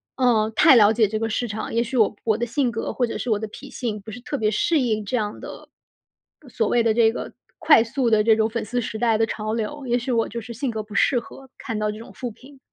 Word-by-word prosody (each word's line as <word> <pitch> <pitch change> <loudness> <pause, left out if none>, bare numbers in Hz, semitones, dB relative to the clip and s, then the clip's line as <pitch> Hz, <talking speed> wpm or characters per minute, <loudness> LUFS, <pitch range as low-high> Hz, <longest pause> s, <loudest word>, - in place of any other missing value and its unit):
嗯， 230 -4 +2
太 305 +1 +7
了 215 -3 +6
解 220 -1 +3
这 215 +2 -3
个 225 0 -1
市 240 +2 -1
场， 220 0 -5
也 230 - +3
许 240 +3 -6
我 215 -2 +3
我 220 -2 +2
的 240 - -2
性 245 0 0
格 225 - -3
或 250 - +1
者 230 - -5
是 245 - -4
我 215 - +2
的 220 - -5
脾 210 - -11
性 220 -4 -4
不 210 - -11
是 220 - -8
特 285 +2 -4
别 215 -1 +2
适 310 +9 +1
应 215 -4 -1
这 250 - -2
样 210 -2 -3
的 - - -10 0.7
呃， 275 - -16
所 225 -2 -1
谓 240 - +2
的 225 -1 +2
这 225 -1 +4
个 - - -6 0.3
快 295 -8 +6
速 240 +1 -1
的 215 -1 +3
这 220 0 +5
种 220 0 +1
粉 230 -1 -3
丝 245 +3 -2
时 220 - -5
代 225 -1 +1
的 225 - +2
潮 215 0 -3
流， 235 +6 -4
也 240 +1 +1
许 250 +2 -4
我 230 -2 +1
就 235 +1 -6
是 235 - -10
性 245 +2 -3
格 220 -1 -3
不 210 -1 -11
适 245 - +3
合 265 +2 -13
看 225 -4 -4
到 210 0 -1
这 215 - -9
种 230 - -11
负 245 -3 -5
评。 265 +5 -17
225 Hz, 305 characters per minute, -23 LUFS, 215-245 Hz, 0.7 s, 太